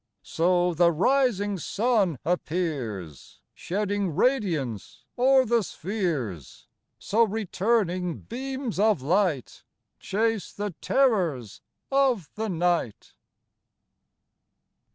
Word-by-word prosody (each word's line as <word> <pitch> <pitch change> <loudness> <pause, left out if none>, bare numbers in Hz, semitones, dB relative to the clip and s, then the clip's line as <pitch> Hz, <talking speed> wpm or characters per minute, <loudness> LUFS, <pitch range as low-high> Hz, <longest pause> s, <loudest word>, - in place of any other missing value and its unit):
So 175 +1 +1
the 170 +1 +4
rising 205 - +1
sun 205 - +1
appears. 130 - -3
Shedding 200 -1 -2
radianceo'er 240 - +1
the 235 0 +2
spheres; 160 - -4 0.3
So 220 +3 0
returning 200 -4 0
beams 260 -2 -5
of 210 -10 +3
light 170 - 0 0.4
Chase 220 0 -1
the 205 -2 -4
terrors 180 - +1 0.3
of 260 - +2
the 220 0 -3
night. 175 - -1
190 Hz, 80 wpm, -26 LUFS, 165-225 Hz, 0.4 s, the